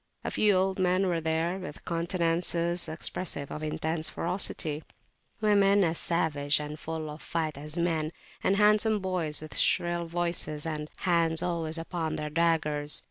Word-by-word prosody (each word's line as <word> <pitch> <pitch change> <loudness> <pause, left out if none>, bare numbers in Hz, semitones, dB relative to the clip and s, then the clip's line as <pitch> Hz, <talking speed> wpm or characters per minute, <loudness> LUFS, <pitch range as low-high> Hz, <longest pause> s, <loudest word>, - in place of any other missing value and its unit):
A - - -3
few 210 -1 +4
old 190 +1 +1
men 185 +1 +3
were 170 -3 0
there, 160 +3 0
with 180 -5 -8
countenances 170 0 0
expressive 155 -2 -3
of 150 - -5
intense 155 +1 -1
ferocity; 165 -3 -1 0.6
women 200 -1 +5
as 165 -1 +1
savage 150 -4 +1
and 150 0 -6
full 160 0 -4
of 150 +1 -8
fight 160 -2 -2
as 150 +3 -6
men; 165 -2 0 0.3
and 195 - +3
handsome 210 +1 +4
boys 180 -6 -1
with 155 - -8
shrill 175 0 +2
voices, 170 -3 -2
and. 155 -1 -3
hands 170 -3 +2
always 165 -2 -2
upon 165 -1 -3
their 150 0 -4
daggers. 155 -3 +3
165 Hz, 150 wpm, -29 LUFS, 155-180 Hz, 0.6 s, women